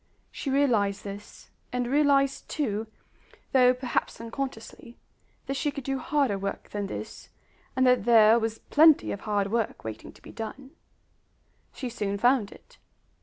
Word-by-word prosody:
She 280 - -5
realized 230 -8 +1
this, 200 +1 -10 0.2
and 250 0 -1
realized 275 0 +2
too, 220 -7 -2 0.6
though 250 -1 +6
perhaps 250 -1 -2
unconsciously, 230 0 -7 0.5
that 275 - -3
she 285 +2 -1
could 280 -1 -6
do 270 +1 -2
harder 260 -7 0
work 200 0 -5
than 205 -1 -3
this, - - -8 0.5
and 260 0 +3
that 250 -4 +3
there 225 -1 +6
was 225 0 -2
plenty 310 +4 +4
of 200 - -4
hard 205 -2 -1
work 230 -1 -1
waiting 110 -1 -7
to - - -20
be - - -11
done. 260 +4 -8 1.0
She 255 - -6
soon 205 -4 -3
found 245 -1 +2
it. - - -18
240 Hz, 150 wpm, -27 LUFS, 210-270 Hz, 1.0 s, though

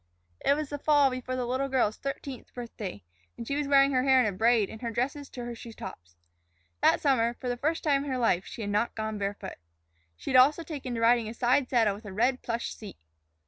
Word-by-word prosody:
It 280 - +4
was 300 -1 -4
the 290 - -5
fall 290 -2 +4
before 255 0 -4
the 250 -1 -2
little 260 +3 -1
girl's 245 -5 +1
thirteenth 275 -2 -6
birthday, 215 - -7 0.3
and 235 - -6
she 280 - -1
was 295 -1 -1
wearing 275 0 +5
her 255 -2 +2
hair 265 0 +5
in 250 - +4
a 210 - +1
braid 225 0 +3
and 220 - -10
her 235 - -2
dresses 270 +5 -2
to 245 -1 -7
her 240 - -5
shoe 230 0 -10
tops. 85 - -10 0.7
That - - +4
summer, 240 -5 +2
for 250 - -7
the 245 - 0
first 310 +6 -1
time 280 -3 +2
in 285 - -5
her 260 - -1
life, 210 -7 +2
she - - -8
had 205 -1 -3
not 210 +3 0
gone 220 -1 -3
barefoot. 200 0 -4 0.6
She - - -5
had 255 - +7
also 295 +6 +5
taken 280 -6 -5
to 230 - -3
riding 230 -1 +3
a 225 - -8
side 250 +2 +2
saddle 225 -5 +3
with 210 +3 -11
a 200 - -7
red 250 +5 +1
plush 235 0 -3
seat. 210 - -10
245 Hz, 240 wpm, -28 LUFS, 225-275 Hz, 0.7 s, had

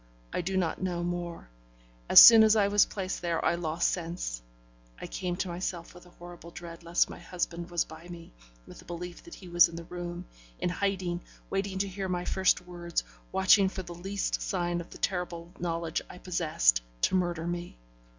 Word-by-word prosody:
I - - 0
do 190 +2 -2
not 175 -2 -1
know 175 -2 -2
more; 175 - -4 0.6
as - - +11
soon 230 -1 +11
as 220 0 +6
I 200 -2 +3
was 205 0 +5
placed 190 -2 -4
there 170 -2 -1
I - - +3
lost 170 -1 0
sense; 165 - -3 0.6
I - - -6
came 180 -1 -3
to 185 - -2
myself 175 -1 -5
with 180 0 -15
a 175 - -20
horrible 175 -1 -11
dread 170 -1 -10
lest 170 +1 +2
my - - -10
husband 175 -1 -4
was 175 -1 0
by 160 +2 -12
me, 170 -1 -11 0.3
with - - -12
a - - -18
belief 175 0 -7
that 340 - -10
he 185 - -12
was 175 -1 +5
in 165 - -10
the 170 - -6
room, 175 +1 -6 0.3
in - - -1
hiding, 180 -2 -1 0.3
waiting 195 0 -2
to 200 +1 0
hear 190 0 -4
my 180 -1 -2
first 190 -1 +2
words, 175 -1 -3 0.3
watching 190 +1 +5
for 190 0 -6
the 175 0 -8
least 195 +4 -3
sign 175 -2 -1
of 170 - -12
the - - -11
terrible 175 -2 -3
knowledge 165 -2 -2
I - - -10
possessed 155 - +2 0.2
to - - +2
murder 175 -3 0
me. 175 - -5
175 Hz, 200 wpm, -29 LUFS, 170-185 Hz, 0.6 s, as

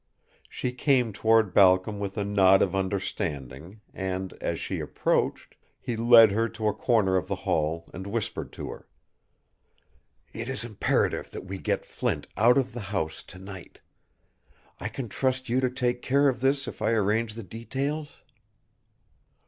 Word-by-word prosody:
She 125 - -3
came 125 -3 +1
toward 110 -2 +3
Balcom 95 +2 +4
with 100 +1 -4
a 105 - 0
nod 95 -1 +5
of 95 - -1
understanding, 95 - -4
and, 95 0 -4
as - - -2
she - - -3
approached, - - -1 0.3
he 120 - -4
led 115 -1 +7
her 115 +3 +1
to 110 -1 -3
a 105 - +2
corner 105 -6 +2
of 90 - -2
the - - -1
hall 80 +2 -1
and 95 +2 -7
whispered 110 +1 -3
to - - -6
her. - - -11 1.5
"It 115 +2 -5
is 130 -3 +2
imperative 110 -4 0
that - - -8
we 95 0 -6
get - - -1
Flint - - -2
out 120 +5 +5
of 130 -2 0
the 120 - -5
house 80 -6 -2
to - - -14
night. 95 -2 -11 1.0
I - - -3
can 130 -3 -5
trust 130 +2 -1
you 125 +2 +2
to 130 -1 +1
take 125 -1 -1
care 140 +2 +3
of 125 -4 0
this 135 +1 +1
if - - -8
I - - +2
arrange 110 +1 +1
the 115 - -6
details?" 135 - -5
110 Hz, 165 wpm, -27 LUFS, 95-125 Hz, 1.5 s, led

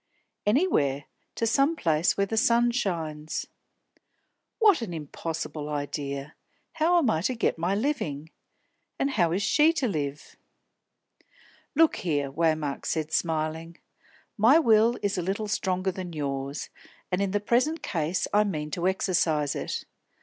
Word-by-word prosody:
"Anywhere. 150 - +2 0.3
To 230 - 0
some 275 +7 +3
place 165 - +1
where 200 - +2
the 225 - -3
sun 235 +1 +3
shines." 160 -9 -3 1.1
"What 420 - +5
an 185 -7 -4
impossible 155 0 -5
idea! 145 0 -4 0.4
How 330 +2 +3
am 275 -10 +3
I 160 - 0
to 250 +8 0
get 225 - 0
my 175 +4 0
living? 180 - -2 0.7
And 275 - 0
how 175 -10 +2
is 190 +4 0
she 305 +9 +4
to 275 -6 0
live?" 145 -7 -4 1.4
"Look 325 +1 +4
here," 145 -5 -1
Waymark 155 -2 0
said, 155 -1 -2
smiling, 160 +1 -1 0.6
"my 235 +9 +7
will 230 -4 +4
is 200 -2 0
a - - 0
little 195 +5 -2
stronger 190 -2 0
than 180 -2 -7
yours, 140 -1 -4 0.4
and 180 +2 +1
in 200 - +1
the 205 +2 0
present 255 +10 +1
case 165 0 -1
I 210 +1 +5
mean 155 -7 -3
to 175 +4 -1
exercise 165 -6 +1
it. - - -4
180 Hz, 140 wpm, -27 LUFS, 155-230 Hz, 1.4 s, my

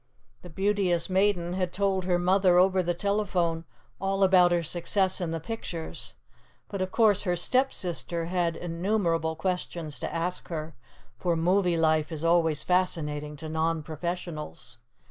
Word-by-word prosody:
The 180 - -11
Beauteous 190 -1 +1
Maiden 185 -2 +2
had 185 -1 -1
told 190 -1 0
her 180 -1 +2
mother 180 0 +3
over 185 +1 +4
the 175 -1 -1
telephone 180 -4 0 0.3
all 195 +1 0
about 185 -2 +6
her 175 -1 +2
success 185 +4 +1
in 175 - -1
the 165 0 -2
pictures; 170 -3 -5 0.5
but 200 -2 -4
of 185 - -1
course 210 -1 +3
her 180 -3 0
Stepsister 175 -6 0
had 170 -1 0
innumerable 170 -2 -1
questions 165 -4 -3
to - - -4
ask 170 +2 -3
her, 160 -1 -5 0.5
for 175 -1 +1
movie 180 +1 +2
life 155 0 +2
is 160 -1 -4
always 165 -3 +3
fascinating 150 -5 0
to 155 +2 -7
non 160 0 -1
professionals. 155 -5 -6
175 Hz, 145 wpm, -27 LUFS, 165-190 Hz, 0.5 s, about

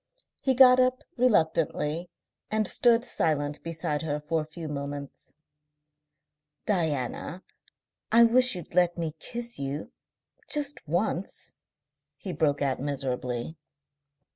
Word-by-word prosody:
He 265 -1 +2
got 255 0 +8
up 255 0 +2
reluctantly 165 - +1 0.4
and 215 -1 +1
stood 235 0 +3
silent 145 -2 0
beside 160 -3 -2
her 150 -2 -2
for 155 +2 -1
a 155 - -8
few 160 +1 -7
moments. 140 -2 -6 1.3
"Diana, 160 - -2 0.7
I 230 +1 +7
wish 250 0 +5
you'd 175 -2 -9
let 175 0 +3
me 165 -2 -2
kiss 240 +4 -6
you, 140 +2 -4 0.6
just 290 -1 -1
once," 175 +3 -2 0.6
he 185 - -6
broke 145 -2 +1
out 135 -2 0
miserably. 130 0 -3
165 Hz, 115 wpm, -27 LUFS, 145-230 Hz, 1.3 s, got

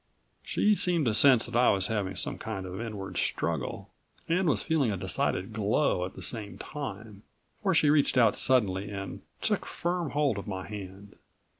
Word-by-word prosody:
She 210 - +2
seemed 175 -6 +2
to 115 - +2
sense 125 0 +6
that 120 - -7
I 125 +1 +5
was 95 -1 +5
having 100 -3 -2
some - - -1
kind 100 -4 -5
of 95 +4 -6
inward 105 -4 -6
struggle, - - -2 0.4
and 175 +1 +2
was 115 -8 +1
feeling 145 -8 +1
a 100 - -2
decided 95 +3 -1
glow 105 -2 +1
at 95 - -9
the - - -7
same 105 -3 -1
time, 110 -8 -7 0.4
for 190 -4 +1
she 150 -2 +4
reached 145 -3 +3
out 115 -4 +5
suddenly 100 -6 +1
and 95 -1 -6 0.2
took - - 0
firm 175 -2 -2
hold 140 -6 0
of 100 - -9
my 95 -3 -5
hand. 100 -1 -9
110 Hz, 180 wpm, -28 LUFS, 100-145 Hz, 0.4 s, sense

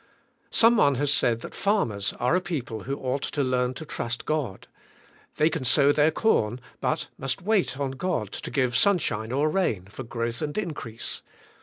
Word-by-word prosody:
Some 230 +1 +5
one 140 -8 +4
has 145 +2 +1
said 115 -3 +2
that - - -8
farm 200 - +1
ers 100 -1 -2
are 125 +8 +2
a 185 - +2
people 130 - -4
who 135 +2 -2
ought 130 +1 -2
to 145 - -1
learn 125 -1 0
to 155 - -7
trust 115 -5 -4
God. 145 -11 -2 0.7
The}' 155 +2 +4
can 160 - -2
sow 140 +3 +5
their 150 +1 +4
corn 125 - +1 0.2
but - - 0
they - - -12
must 135 +4 -2
wait 195 - +1
on 140 -2 -1
God 135 - -2
to - - -6
give 130 -4 0
sunshine 125 - +2
or 140 +4 +2
rain 150 - 0
for 100 +7 -9
growth 115 -1 -3
and 150 +2 -3
increase. 150 - -4
135 Hz, 190 wpm, -26 LUFS, 120-160 Hz, 0.7 s, Some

